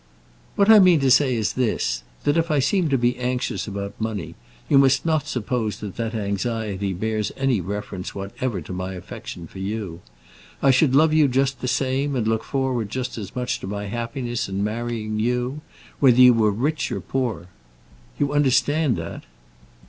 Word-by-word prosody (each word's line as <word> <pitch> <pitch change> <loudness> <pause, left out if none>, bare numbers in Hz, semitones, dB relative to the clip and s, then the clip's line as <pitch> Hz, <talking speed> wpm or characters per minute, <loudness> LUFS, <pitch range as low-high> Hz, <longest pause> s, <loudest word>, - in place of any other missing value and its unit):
"What 200 - +3
I 220 -1 +9
mean 180 -4 +6
to 135 -1 +3
say 130 -1 +4
is 110 -3 -1
this, 65 - 0 0.2
that 145 - +2
if 165 0 +1
I 150 - +2
seem 160 +5 +2
to 135 - +2
be 120 0 +1
anxious 125 -1 -2
about 100 +1 -6
money, 110 -7 -3 0.3
you 135 - +5
must 135 +1 +3
not 155 -3 +1
suppose 125 -5 -2
that 100 -3 -7
that 115 -1 -3
anxiety 100 -1 -2
bears 110 +3 -2
any 130 -6 +1
reference 95 0 -5
whatever 100 +1 -4
to 85 - -8
my 95 +1 -4
affection 85 -1 -8
for 95 - -11
you. 95 -4 -4 0.6
I 135 - +4
should 130 +1 +3
love 155 +2 +5
you 155 -2 +5
just 135 +1 0
the 125 - -2
same, 135 +3 0
and 115 -4 0
look 110 0 0
forward 130 -6 -1
just 130 +2 -4
as 100 -3 -8
much 125 -1 -2
to - - -7
my 100 +1 -4
happiness 120 +2 -3
in 95 +1 -2
marrying 110 0 -3
you, 125 +5 -1 0.4
whether 130 -4 +5
you 125 -1 +9
were 110 -2 +3
rich 140 +10 -1
or - - -2
poor. 120 -10 -3 0.7
You 145 0 0
understand 145 0 +2
that?" - - -7
120 Hz, 180 wpm, -23 LUFS, 105-135 Hz, 0.7 s, I